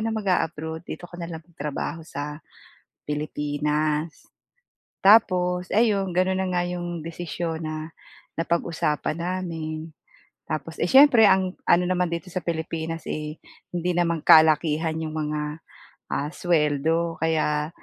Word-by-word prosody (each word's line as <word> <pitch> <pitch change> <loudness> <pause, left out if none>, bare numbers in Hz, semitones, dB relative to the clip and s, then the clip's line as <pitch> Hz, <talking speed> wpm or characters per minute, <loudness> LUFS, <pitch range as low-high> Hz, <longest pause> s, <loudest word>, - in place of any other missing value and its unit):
na - - 0
mag-aabroad, 160 -6 -1
dito - - -7
ka 175 - -10
na 170 - -5
lang 160 -1 -7
magtrabaho 160 0 -5
sa 150 +2 -6 0.7
Pilipinas." 150 +1 -2 0.8
Tapos 180 -4 +4
ayun, 205 -4 +2
ganoon 185 +1 +2
na 190 - -1
nga 175 - +2
iyong 175 -2 -4
desisyon 165 -1 -4
na 155 0 -5 0.5
napag-usapan 165 -2 -1
namin. 165 -3 -4 0.6
Tapos 160 +1 -3
eh, - - +3
siyempre 265 -5 +8
ang 190 -1 +2
ano 180 +1 +5
naman 180 -1 0
dito 170 +3 -4
sa 185 - -3
Pilipinas 165 -1 -3
eh 150 0 -4 0.4
hindi 175 +1 -1
naman 170 -1 +1
kalakihan 160 0 +5
yung 155 -1 -4
mga, 150 0 -3 0.5
ah, 145 +2 -1
sweldo. 165 0 +1
Kaya 155 -2 +1
165 Hz, 125 wpm, -25 LUFS, 155-180 Hz, 0.8 s, siyempre